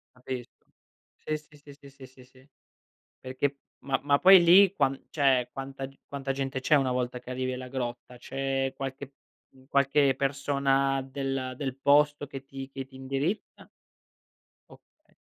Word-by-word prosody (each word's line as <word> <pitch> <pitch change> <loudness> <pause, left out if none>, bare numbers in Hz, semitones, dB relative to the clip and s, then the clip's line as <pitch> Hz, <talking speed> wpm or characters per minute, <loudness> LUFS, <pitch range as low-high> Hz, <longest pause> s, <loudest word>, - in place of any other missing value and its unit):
Capisco. 125 -1 -8 0.6
Sì, 155 - -1
sì, 150 0 -19 0.2
sì, 140 0 -15
sì, 135 -1 -13
sì, 130 0 -18
sì. 130 +2 -22 0.7
Perché, 135 +2 -2 0.3
ma 135 0 0
ma 140 0 +3
poi 190 +1 +8
lì, 185 +3 +7
qua 135 -5 +2 0.2
cioè, 135 -4 +2
quanta 135 0 -6 0.2
quanta 135 -1 -3
gente 135 0 -3
c'è 150 - +2
una 135 -3 +3
volta 125 0 -2
che 125 - -11
arrivi 130 0 -2
alla 125 0 -7
grotta? 125 -1 -5
C'è 135 +1 -2
qualche, 135 0 -6 0.4
mhmm, 130 0 -21
qualche 140 0 +3
persona 135 0 +1
del 135 -1 -4
del 135 -2 -4
posto 145 +1 +3
che 135 -1 -9
ti 135 -1 -8
che 135 0 -6
ti 135 0 -16
indirizza? 135 +9 -4 1.0
Okay. - - -22
135 Hz, 150 wpm, -28 LUFS, 130-140 Hz, 1.0 s, poi